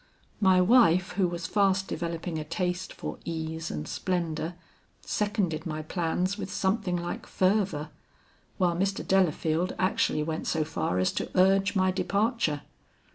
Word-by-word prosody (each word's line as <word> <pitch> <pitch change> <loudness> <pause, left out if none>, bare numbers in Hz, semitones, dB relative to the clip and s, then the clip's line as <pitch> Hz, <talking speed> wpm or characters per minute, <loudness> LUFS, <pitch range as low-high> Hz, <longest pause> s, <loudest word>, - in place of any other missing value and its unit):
My 190 -2 +5
wife, 185 -4 +5
who 185 0 +1
was 170 -1 -4
fast 195 -1 +2
developing 170 0 -3
a - - -3
taste 180 +3 -2
for - - -6
ease 160 -1 -4
and 75 - -4
splendor, 170 -2 -2 0.5
seconded 195 -7 -1
my 155 -1 -4
plans 180 +5 -1
with 195 -1 -5
something 190 -2 0
like 175 0 -5
fervor, 185 -5 +1 0.7
while 175 -3 +2
Mr. 195 +2 -1
Delafield 175 -2 +2
actually 185 -4 +1
went 160 0 -3
so 160 - +1
far 150 - -2
as 95 0 +2
to - - -3
urge 195 +2 +4
my 185 -1 +3
departure. 200 - 0
180 Hz, 140 wpm, -28 LUFS, 160-195 Hz, 0.7 s, My